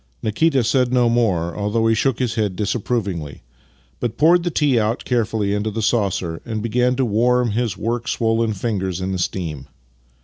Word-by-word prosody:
Nikita 135 +5 +2
said 125 +1 +2
no 125 -2 +3
more 95 -8 +1
(although 105 +2 0
he 115 - +4
shook 115 +2 +1
his 125 -4 -1
head 105 -5 -1
disapprovingly), 100 - -2 0.6
but 120 -3 -3
poured 170 +4 +5
the 175 - -1
tea 145 -6 +2
out 110 +2 -1
carefully 110 -4 0
into 105 +1 -1
the 110 +1 -3
saucer 95 -7 0
and 110 -2 -4
began 125 +2 +1
to 130 0 +1
warm 120 +2 +2
his 115 0 -1
work 120 +1 -2
swollen 115 -1 +1
fingers 95 -4 -2
in 95 +1 -3
the 95 - -2
steam. 80 -6 -3
115 Hz, 175 wpm, -20 LUFS, 100-120 Hz, 0.6 s, poured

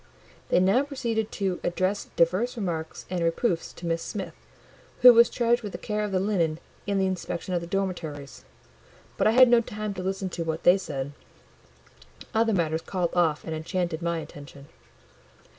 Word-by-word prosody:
They - - +4
now 195 +7 +4
proceeded 235 -6 -2
to 190 -3 -1
address 185 +3 -1
divers 185 +9 +1
remarks 165 -6 -4
and 180 -2 -2
reproofs 165 +1 0
to 175 - -10
Miss 165 0 -1
Smith, 190 -5 -5 0.7
who 250 0 +11
was 235 0 +6
charged 240 0 +1
with 205 -4 -7
the - - -4
care 210 -1 -2
of 210 - -3
the 185 - +1
linen 180 -6 0 0.3
and 200 -1 +1
the 190 - +2
inspection 185 -1 -3
of 175 - 0
the 170 - -7
dormitories: 170 -7 -4 0.7
but - - +2
I - - +5
had 255 +1 +8
no 240 -1 +5
time 215 -2 -5
to 185 - -6
listen 190 0 -2
to 170 -1 -4
what 160 0 -3
they 180 +2 +6
said; 140 -6 -4 1.2
other 225 0 +2
matters 165 -4 0
called 180 -2 -2
off 165 -4 +2
and 160 - -5
enchanted 170 +1 -2
my 170 0 -1
attention. 140 -3 -10
185 Hz, 175 wpm, -26 LUFS, 165-210 Hz, 1.2 s, who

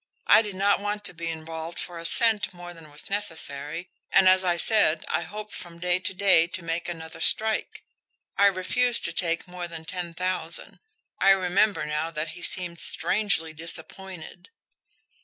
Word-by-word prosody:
I - - +7
did 205 -3 -6
not 200 +1 +2
want 205 +1 -3
to - - -4
be 170 0 -6
involved 160 +1 -6
for 175 -2 -6
a 165 - -8
cent 210 -3 +2
more 175 0 -9
than 165 -2 -14
was 145 +1 -9
necessary, 165 -4 -2 0.2
and, 190 - +5
as 185 0 +6
I 175 -2 +1
said, 170 -4 +4
I - - 0
hoped 210 +5 -8
from 170 -1 -9
day 180 +1 +1
to 185 - -2
day 185 -4 +4
to 175 0 -6
make 165 +1 -3
another 160 -1 -8
strike. 220 +5 0 0.5
I 200 - +5
refused 230 +6 +1
to 170 - 0
take 170 0 -1
more 180 -1 -6
than 165 -1 -9
ten 175 -1 -4
thousand. 180 -2 -1 0.4
I 195 - +4
remember 195 +2 +3
now 150 +2 -2
that 160 0 -3
he 175 - -9
seemed 175 -2 +1
strangely 195 -7 +1
disappointed." 170 - -6
175 Hz, 175 wpm, -26 LUFS, 165-195 Hz, 0.5 s, I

